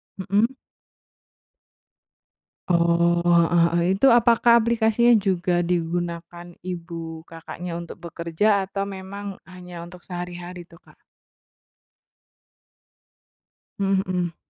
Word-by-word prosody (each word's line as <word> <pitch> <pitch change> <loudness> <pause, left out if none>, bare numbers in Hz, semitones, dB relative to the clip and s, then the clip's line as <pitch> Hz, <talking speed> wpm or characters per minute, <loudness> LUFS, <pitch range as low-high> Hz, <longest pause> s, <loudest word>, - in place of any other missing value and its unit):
Mhm? 205 +7 0 2.1
Oh, 170 0 +3 0.2
heeh 170 -1 +3
heeh. 170 0 +1
Itu 270 - +4
apakah 235 0 +5
aplikasinya 235 +1 +3
juga 175 -1 +1
digunakan 175 0 -3
ibu 165 -2 -7
Kakaknya 165 +1 -8
untuk 170 - -8
bekerja 170 +3 -2 0.2
atau 195 0 -3
memang 200 0 -7
hanya 180 -1 -10
untuk 175 0 -14
sehari-hari 175 -1 -7
tuh, 170 - -17
Kak? - - -22 2.8
Mhm 195 -1 +2
mhm. 180 -2 -2
180 Hz, 90 wpm, -23 LUFS, 170-195 Hz, 2.8 s, apakah